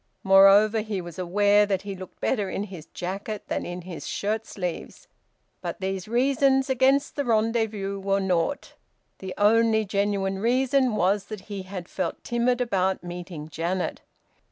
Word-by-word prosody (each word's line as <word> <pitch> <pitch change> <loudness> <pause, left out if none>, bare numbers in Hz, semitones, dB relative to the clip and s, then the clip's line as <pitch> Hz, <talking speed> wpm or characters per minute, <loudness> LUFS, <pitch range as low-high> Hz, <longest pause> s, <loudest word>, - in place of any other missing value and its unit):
Moreover, 195 +3 +6
he 215 -2 -3
was 175 -1 -8
aware 205 +3 +3
that 195 -2 -1
he 200 -1 -5
looked 185 0 -11
better 205 -7 0
in 200 - -3
his 185 -6 -9
jacket 195 +4 -5
than - - -2
in 175 +1 -5
his 175 -2 -7
shirt 215 +2 -2
sleeves. 180 -4 -6 0.5
But - - -5
these 190 0 -3
reasons 265 +3 +2
against 265 +2 +2
the 285 - -1
rendezvous 220 -4 0
were 195 0 +1
naught. 190 +7 -1 0.5
The 190 -1 -6
only 220 +1 +4
genuine 200 -1 -1
reason 255 +2 +2
was 195 +1 +1
that 215 -2 -7
he 200 0 -6
had 185 -2 -7
felt 185 -3 -4
timid 240 +1 +1
about 190 -6 0
meeting 175 -3 -7
Janet. 170 +4 -3
200 Hz, 155 wpm, -25 LUFS, 185-225 Hz, 0.5 s, Moreover